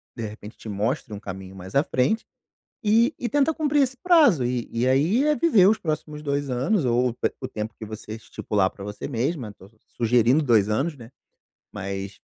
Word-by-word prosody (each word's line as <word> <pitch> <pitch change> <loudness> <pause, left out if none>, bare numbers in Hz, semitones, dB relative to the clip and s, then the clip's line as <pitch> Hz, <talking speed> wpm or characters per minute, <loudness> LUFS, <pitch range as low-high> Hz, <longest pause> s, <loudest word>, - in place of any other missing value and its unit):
de 115 - -5
repente 105 +1 -11
te - - -11
mostre 110 +4 -2
um 100 - -6
caminho 95 -2 -8
mais 95 +1 -10
à 140 - +5
frente, 140 - 0 0.6
e 230 +6 +4
e 240 - -2
tenta 290 +3 +2
cumprir 295 -2 +2
esse 260 -1 -1
prazo. 290 - +4
E 120 -1 -2
e 115 +2 0
aí 165 - +3
é 300 - +4
viver 230 - +5
os 220 - +3
próximos 155 -2 -4
2 140 -1 -1
anos, 135 - +1
ou 120 0 +2 0.3
o - - -3
tempo 110 +1 -5
que - - -7
você 110 0 -7
estipular 105 -3 -1
pra 100 - -10
você 105 0 -6
mesma, 125 -2 -2
tô 95 - -16 0.3
sugerindo 120 +5 +3
2 110 -7 +3
anos, 140 +9 0
né, 115 -3 -12 0.6
mas, 100 0 -5
125 Hz, 190 wpm, -24 LUFS, -, 0.6 s, à